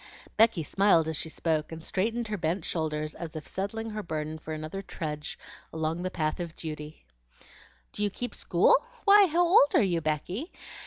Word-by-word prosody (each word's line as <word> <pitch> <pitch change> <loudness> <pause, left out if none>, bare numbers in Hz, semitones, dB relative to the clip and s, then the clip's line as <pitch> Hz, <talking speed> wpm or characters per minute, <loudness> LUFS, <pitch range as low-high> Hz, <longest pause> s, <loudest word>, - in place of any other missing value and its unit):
Becky 220 -6 +4
smiled 180 -1 +3
as 160 - -1
she 160 - -3
spoke, 155 -1 -1
and 160 0 -7
straightened 225 +4 -1
her 210 - -1
bent 165 +2 -1
shoulders 155 -2 -2
as 165 -1 -7
if 155 - -6
settling 220 +4 -3
her 215 0 -4
burden 155 -3 -4
for 155 - -8
another 155 +5 -5
trudge 150 -5 -5 0.3
along 160 +1 -2
the 185 - -2
path 155 -3 -2
of 170 -2 -5
duty. 150 - -7 0.9
"Do - - -5
you 205 - +2
keep 245 +5 -4
school? - - +4 0.3
Why, 405 -1 +8
how 345 +2 +3
old 340 -5 +5
are - - +6
you, 175 -4 +1
Becky?" 170 - -2
165 Hz, 180 wpm, -28 LUFS, 155-210 Hz, 0.9 s, Why